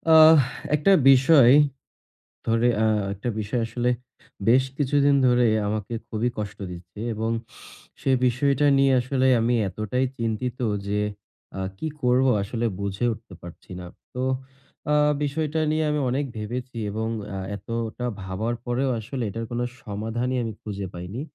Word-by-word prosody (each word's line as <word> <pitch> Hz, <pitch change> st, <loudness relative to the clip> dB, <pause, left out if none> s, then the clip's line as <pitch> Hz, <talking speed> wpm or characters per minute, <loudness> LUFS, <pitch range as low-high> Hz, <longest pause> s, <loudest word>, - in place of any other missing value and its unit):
আহ 160 Hz, 0 st, +9 dB, 0.4 s
একটা 150 Hz, +7 st, +3 dB, 0.2 s
বিষয়, 135 Hz, -1 st, +7 dB, 0.9 s
ধরে, 115 Hz, +1 st, +3 dB, 0.2 s
আ -, -, +4 dB, 0.3 s
একটা 100 Hz, +5 st, -5 dB
বিষয় 110 Hz, +4 st, -2 dB
আসলে 120 Hz, +2 st, -1 dB, 0.6 s
বেশ 130 Hz, +3 st, +5 dB
কিছুদিন 145 Hz, 0 st, +3 dB
ধরে 125 Hz, -1 st, +4 dB, 0.2 s
আমাকে 105 Hz, +2 st, -3 dB
খুবই 110 Hz, +2 st, -1 dB
কষ্ট 105 Hz, -1 st, -5 dB
দিচ্ছে 90 Hz, +3 st, -10 dB
এবং 110 Hz, +1 st, -2 dB, 0.7 s
সে -, -, 0 dB, 0.2 s
বিষয়টা 140 Hz, +3 st, +2 dB
নিয়ে 135 Hz, 0 st, +4 dB
আসলে 130 Hz, +1 st, 0 dB
আমি 120 Hz, +2 st, +2 dB
এতটাই 110 Hz, +7 st, -1 dB
চিন্তিত 115 Hz, +2 st, -2 dB, 0.3 s
যে 105 Hz, +1 st, 0 dB, 0.6 s
আ -, -, -3 dB, 0.2 s
কি 160 Hz, -, -3 dB
করব? 125 Hz, +1 st, +3 dB, 0.2 s
আসলে 115 Hz, +4 st, -2 dB
বুঝে 100 Hz, +3 st, -1 dB
উঠতে 105 Hz, -3 st, -10 dB
পারছি 85 Hz, +1 st, -12 dB
না। 90 Hz, -, -8 dB, 0.3 s
তো 125 Hz, -, -2 dB, 0.7 s
আ -, -, +4 dB, 0.3 s
বিষয়টা 155 Hz, +2 st, -1 dB
নিয়ে 155 Hz, 0 st, +1 dB
আমি 150 Hz, 0 st, 0 dB
অনেক 135 Hz, +4 st, 0 dB
ভেবেছি 120 Hz, +3 st, -5 dB
এবং 110 Hz, +2 st, -2 dB, 0.3 s
আ -, -, -3 dB, 0.2 s
এতটা 115 Hz, +4 st, -4 dB, 0.2 s
ভাবার 100 Hz, +5 st, -2 dB
পরেও 130 Hz, +2 st, 0 dB
আসলে 125 Hz, +4 st, -5 dB
এটার 115 Hz, +4 st, -4 dB
কোন 120 Hz, 0 st, -2 dB, 0.2 s
সমাধানই 115 Hz, +4 st, -3 dB
আমি 115 Hz, -1 st, -3 dB
খুঁজে 100 Hz, -2 st, -5 dB
পাইনি। 90 Hz, +7 st, -6 dB
120 Hz, 145 wpm, -24 LUFS, 105-130 Hz, 0.9 s, আহ